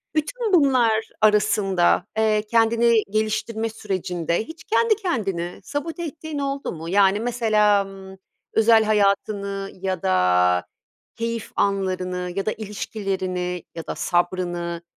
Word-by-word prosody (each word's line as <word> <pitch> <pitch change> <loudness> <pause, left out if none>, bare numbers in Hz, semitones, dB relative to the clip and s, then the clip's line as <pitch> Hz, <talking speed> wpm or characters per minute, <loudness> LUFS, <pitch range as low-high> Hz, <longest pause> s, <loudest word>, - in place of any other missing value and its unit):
Bütün 440 +8 -1
bunlar 250 -9 +3
arasında, 205 -4 +3
eee, 215 -1 +3
kendini 230 +1 +4 0.2
geliştirme 220 +1 -1
sürecinde 185 -5 -2
hiç 320 +5 -11
kendi 455 -1 +2
kendini 200 - -3
sabote 320 +4 -4
ettiğin 315 -1 -6
oldu 275 0 -3
mu? 165 0 -7
Yani, 195 +1 +4
mesela, 215 -3 +2
ımm, 190 0 -11 0.4
özel 225 0 +5
hayatını 200 -1 0
ya 185 -2 -3
da 90 -1 +2 0.9
keyif 230 -1 -4
anlarını 185 -2 -1
ya 195 - -2
da 215 - +1
ilişkilerini 190 -4 -4
ya 165 - -7
da - - -3
sabrını, 175 -1 -1
210 Hz, 115 wpm, -23 LUFS, 185-230 Hz, 0.9 s, özel